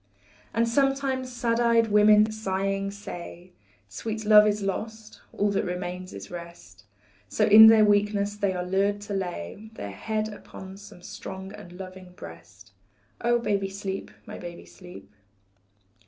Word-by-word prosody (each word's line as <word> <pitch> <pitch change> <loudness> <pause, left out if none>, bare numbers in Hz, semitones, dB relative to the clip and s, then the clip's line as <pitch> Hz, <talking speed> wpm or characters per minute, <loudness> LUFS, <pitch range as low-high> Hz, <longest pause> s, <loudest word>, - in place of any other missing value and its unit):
And 230 +1 +1
sometimes 270 0 0
sad 240 -1 -1
eyed 230 -1 +3
women 210 +1 +5
sighing 195 -2 -2
say, 180 -3 -9 0.4
Sweet 220 - -5
love 210 0 +7
is 210 -1 0
lost, 215 +2 -5
all 205 0 0
that 200 - 0
remains 180 0 -5
is 100 - -10
rest, 170 - -11 0.4
So 215 - +2
in 215 +1 +10
their 220 -1 +7
weakness 205 0 +1
they 200 -2 0
are 180 -1 -3
lured 200 +2 +1
to 205 0 -6
lay 190 - -5
Their 100 - -6
head 215 - -3
upon 190 -1 -11
some 200 -3 -14
strong 190 +2 -8
and 175 - -11
loving 185 0 -10
breast. 100 - -13 0.5
Oh, 240 0 +3
baby, 200 -4 -1
sleep, 195 0 -5 0.2
my - - -9
baby, 175 -1 -9
sleep. 180 - -14
200 Hz, 145 wpm, -26 LUFS, 180-215 Hz, 0.5 s, in